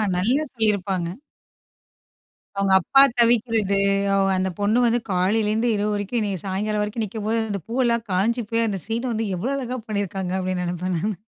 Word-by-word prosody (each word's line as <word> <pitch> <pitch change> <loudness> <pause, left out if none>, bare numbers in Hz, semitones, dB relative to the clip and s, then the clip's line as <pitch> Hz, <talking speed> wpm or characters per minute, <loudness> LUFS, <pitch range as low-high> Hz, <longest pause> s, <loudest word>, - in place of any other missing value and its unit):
நல்லா 240 +12 +1
சொல்லியிருப்பாங்க. 200 -6 0 1.5
அவுங்க 195 -1 +1
அப்பா 270 +9 +5 0.2
தவிக்கிறது, 225 -4 +2 0.3
அவ 195 0 +3
அந்த 190 0 0
பொண்ணு 210 +4 +2
வந்து 235 +1 +2
காலையிலிருந்து 210 +5 +1
இரவு 210 +1 0
வரைக்கும் 205 +3 -2
என்னைய 200 -3 -2
சாயங்காலம் 210 +2 -1
வரைக்கும் 215 +2 -3
நிக்கும்போது, 220 +2 -2
அந்த 200 -2 -3
பூவெல்லாம் 235 -1 0
காய்ஞ்சி 225 +6 +1
போய், 230 0 +2
அந்த 195 -2 -3
சீன் 235 +3 -2
வந்து 225 0 -1
எவ்ளோ 235 +10 -2
அழகா 255 -1 -4
பண்ணியிருக்காங்க? 195 -3 -2
அப்பிடீன்னு 185 -1 -2
நினைப்பேன் 180 +1 -2
நானு 205 +2 -2
210 Hz, 155 wpm, -23 LUFS, 190-230 Hz, 1.5 s, அப்பா